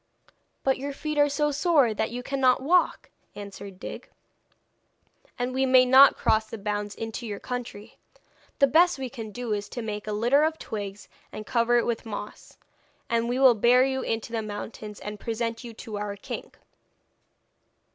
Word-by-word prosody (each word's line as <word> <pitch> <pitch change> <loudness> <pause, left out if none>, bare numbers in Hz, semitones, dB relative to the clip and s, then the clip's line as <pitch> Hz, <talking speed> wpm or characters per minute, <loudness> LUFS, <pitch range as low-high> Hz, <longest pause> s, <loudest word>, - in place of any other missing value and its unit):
'But 265 -1 +1
your 280 +1 -4
feet 305 +1 -3
are 290 0 +5
so 295 +1 0
sore 290 - +3
that 220 +1 -1
you 245 +2 -6
cannot 260 -1 +2
walk,' 350 +5 +2 0.2
answered 200 -2 -9
Dig. - - -8 1.3
'And 245 +1 -2
we 265 +1 +1
may 255 0 +6
not 265 +2 +7
cross 220 0 +2
the 225 - -7
bounds 205 0 -3
into 225 +1 -5
your 205 -2 -5
country. 235 -4 -7 0.6
The 275 - +6
best 335 +5 +4
we 260 -2 -5
can 225 -5 -7
do 235 +1 -4
is 205 0 -4
to 240 - -5
make 210 -1 -5
a - - -2
litter 240 +8 +3
of 315 0 0
twigs 205 -6 -6 0.2
and 215 - -7
cover 240 0 +2
it 235 - +2
with 235 -1 -2
moss, 205 -1 -8 0.5
and 230 0 +1
we 245 - 0
will 260 -2 +7
bear 240 +4 +4
you 265 0 -1
into 225 -1 -3
the 225 -1 -1
mountains, 210 0 -7
and 210 0 -7
present 230 +2 -3
you 240 - -7
to 215 -3 -7
our 205 -1 -4
king.' 200 - -7
235 Hz, 175 wpm, -26 LUFS, 210-265 Hz, 1.3 s, not